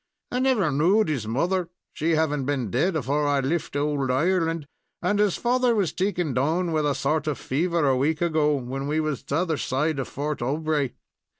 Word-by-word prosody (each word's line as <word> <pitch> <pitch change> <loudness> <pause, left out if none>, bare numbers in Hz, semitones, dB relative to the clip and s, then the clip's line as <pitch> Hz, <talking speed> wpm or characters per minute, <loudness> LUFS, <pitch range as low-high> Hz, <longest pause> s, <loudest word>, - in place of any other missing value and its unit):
"I 250 - 0
never 255 - +2
knowed 175 +8 +3
his 130 -8 -2
mother 170 +9 0 0.2
she 160 +2 +1
havin' 150 -3 +1
been 130 -6 -2
dead 165 +9 +1
afore 145 +1 0
I 145 -1 +2
lift 145 +3 -2
owld 145 -2 0
Ireland 165 +3 +1 0.3
and 205 0 0
his 205 -3 +2
father 250 0 +2
was 195 -6 0
taken 180 -6 -1
down 160 +7 +1
with 155 -2 +1
a 140 - +1
sort 150 +3 0
of 150 -4 -1
fever 165 +4 0
a 135 - +3
week 150 +5 +1
ago, 155 -3 +2
when 135 +1 -4
we 155 +2 0
was 155 -4 -2
t'other 160 +2 -1
side 145 +3 -1
of 135 - -3
Fort 150 +2 -3
Aubray. 145 +1 -1
155 Hz, 190 wpm, -25 LUFS, 140-170 Hz, 0.3 s, knowed